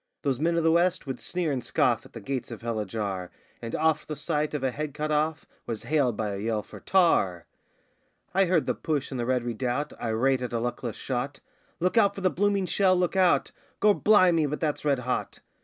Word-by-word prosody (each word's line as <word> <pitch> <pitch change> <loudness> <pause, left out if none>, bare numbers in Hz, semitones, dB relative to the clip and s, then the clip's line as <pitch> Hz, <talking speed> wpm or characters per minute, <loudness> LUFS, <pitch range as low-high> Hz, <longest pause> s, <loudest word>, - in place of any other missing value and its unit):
Those 135 -4 0
men 170 +2 +1
of 165 - +1
the 165 - +4
West 175 +1 +2
would 135 -2 -5
sneer 175 -3 -2
and 130 -3 -2
scoff - - +1
at - - -28
the - - -7
gates 135 -3 -4
of 115 -2 -8
hell 115 -2 -2
ajar, 100 -3 -3 0.3
And 115 -1 -4
oft 160 -1 +1
the 150 - -4
sight 150 -1 -1
of 140 - -3
a 130 - +1
head 150 +1 -5
cut 155 0 -2
off 155 +1 0 0.2
was 115 -2 -4
hailed 140 -7 +1
by 105 -2 -2
a 100 - -4
yell 110 0 -1
for - - -12
'Tar!' 130 - +2 0.9
I 195 +1 +4
heard 170 -3 +2
the - - +1
push 145 -4 -2
in 130 - -4
the 120 - -2
Red 125 -2 +1
Redoubt, 125 +5 -2
irate 125 +3 +1
at 125 -1 -4
a 115 - 0
luckless 120 -1 -3
shot: 130 +2 -3 0.4
'Look 180 +6 +3
out 200 -2 +3
for 195 - -6
the 185 -1 +2
blooming 200 0 +1
shell, 185 0 +3
look 180 +1 0
out!' 185 -2 +3 0.3
'Gor' 210 0 +5
bli' 205 -3 +5
me, 160 -3 +2
but 150 +2 -3
that's 150 -3 -1
red 145 -2 +2
hot! 125 0 -3
145 Hz, 225 wpm, -27 LUFS, 120-170 Hz, 0.9 s, Gor